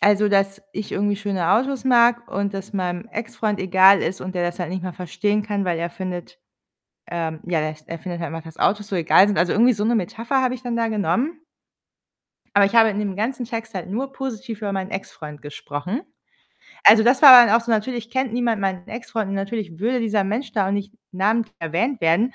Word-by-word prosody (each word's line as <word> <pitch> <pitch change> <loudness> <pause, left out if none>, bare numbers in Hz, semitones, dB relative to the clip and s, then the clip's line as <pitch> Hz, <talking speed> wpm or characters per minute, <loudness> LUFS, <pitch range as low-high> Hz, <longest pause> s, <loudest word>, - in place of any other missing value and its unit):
Also, 205 0 +3
dass 195 0 +1
ich 210 0 -6
irgendwie 205 0 0
schöne 195 -5 -2
Autos 265 +5 +1
mag 240 -2 +3
und 200 +1 -3
das 195 +1 -7
meinem 180 0 -3
Ex-Freund 225 -2 -3
egal 190 +1 +5
ist, 180 +3 -3
und 185 0 -6
der 180 - -1
das 175 0 -3
halt 175 -2 -4
nicht 185 0 -4
mal 185 -1 -5
verstehen 205 +5 -2
kann, 205 -2 -2
weil 175 -2 -1
er 170 +1 -3
findet 180 - -7 0.7
ähm, 160 -2 -4
ja, 170 -3 0
der 155 0 -2
s 155 0 -17
er 165 - -6
findet 175 +1 -6
halt 165 - -5
einfach, 165 0 -7
dass 160 0 -12
Autos 210 0 +1
so 195 - -2
egal 175 +3 +5
sind. 205 - -1
Also, 175 +1 +2
irgendwie 240 +4 +4
so 205 0 -2
'ne 235 +2 +2
Metapher 230 +6 -1
habe 255 -1 0
ich 255 - -10
dann 240 -2 -3
da 230 -1 0
genommen. 250 +9 -1 1.1
Aber 200 0 +6
ich 200 - -4
habe 225 -1 +6
in 205 - -4
dem 200 -3 -3
ganzen 245 +4 -2
Text 225 -2 -6
halt 185 -2 -5
nur 265 +6 -3
positiv 250 -4 -6
über 205 -2 -4
meinen 190 -1 -4
Ex-Freund 150 -6 -8
gesprochen. 150 - -6 0.8
Also, 220 +1 +8
das 250 +5 +3
war 255 -4 +11
dann 220 - +3
auch 230 0 +3
so 235 - -4
natürlich 230 +1 -2
kennt 260 -1 -1
niemand 235 -3 0
meinen 190 -2 -2
Ex-Freund, 225 -2 -4
und 195 - -3
natürlich 195 -3 -4
würde 240 +5 0
dieser 215 -3 0
Mensch 220 +4 -3
da 200 -3 +1
auch - - -1
nicht 200 0 -3 0.2
namentlich 215 +4 0
erwähnt 195 - -2
werden, 170 +10 +2
205 Hz, 225 wpm, -22 LUFS, 185-230 Hz, 1.1 s, war